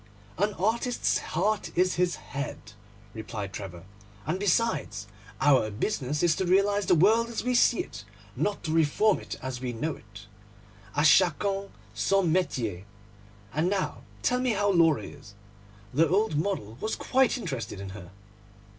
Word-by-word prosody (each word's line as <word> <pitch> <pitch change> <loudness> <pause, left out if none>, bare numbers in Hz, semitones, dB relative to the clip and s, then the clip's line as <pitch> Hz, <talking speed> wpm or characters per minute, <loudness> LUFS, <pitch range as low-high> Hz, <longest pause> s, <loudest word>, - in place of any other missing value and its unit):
'An 205 +1 +1
artist's 235 +6 0
heart 200 +6 -1
is 185 +1 +3
his 175 -1 +1
head,' 135 -6 -7 0.4
replied 110 -3 -6
Trevor; 90 -4 -7 0.4
'and 170 +6 -1
besides, 170 - 0 0.3
our 140 -7 +4
business 140 - -2
is 170 -3 +4
to 190 - 0
realise 200 +2 +3
the - - +4
world 220 +7 +4
as 235 - -3
we 250 +1 0
see 240 -1 +4
it, 105 0 -9 0.3
not 200 +10 -1
to 155 - -2
reform 165 +6 +3
it - - -7
as 130 -1 -4
we 125 -2 -3
know 150 +8 -2
it. 100 -1 -14 0.7
À 145 - +2
chacun 195 +5 +3 0.2
son 180 - +2
métier. 115 - -1 0.7
And 160 +5 +1
now 200 -1 -2 0.2
tell 250 - +2
me 250 -2 +1
how 205 0 +2
Laura 165 -5 +4
is. 100 -1 -12 0.6
The 160 +5 +3
old 200 -2 +2
model 150 - -2
was 220 - -1
quite 265 +1 +2
interested 120 - -5
in 100 -1 -6
her. 95 -3 -10
165 Hz, 155 wpm, -27 LUFS, 120-200 Hz, 0.7 s, our